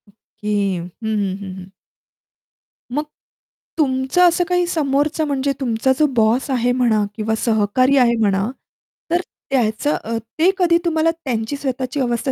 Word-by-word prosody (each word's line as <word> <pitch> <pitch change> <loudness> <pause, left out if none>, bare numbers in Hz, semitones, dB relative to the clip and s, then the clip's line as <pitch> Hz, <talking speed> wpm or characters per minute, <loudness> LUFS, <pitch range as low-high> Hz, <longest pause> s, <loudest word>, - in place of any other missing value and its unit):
Okay 210 0 -8 0.3
हं, 170 +1 -6
हं, 205 -3 -1
हं, 190 -2 -7
हं. 185 0 -11 1.2
मग 295 +4 -1 0.7
तुमचं 265 +4 +3
असं 345 +1 +1
काही 355 0 +2
समोरचं 300 -1 0
म्हणजे 280 -1 0
तुमचा 245 -1 +1
जो 305 - +5
बॉस 230 +5 +2
आहे 245 -1 +1
म्हणा 235 -4 +2
किंवा 220 0 -1
सहकारी 230 +5 +3
आहे 240 -2 +4
म्हणा. 200 -1 +1 0.6
तर 345 +1 +2 0.3
त्याचं 245 +2 +1
अ, 230 +1 -2 0.2
ते 340 +4 +5
कधी 345 -3 +4
तुम्हाला 325 -1 +2
त्यांची 260 -7 -3
स्वतःची 260 -1 -3
अवस्था 245 +1 0
255 Hz, 140 wpm, -20 LUFS, 220-290 Hz, 1.2 s, जो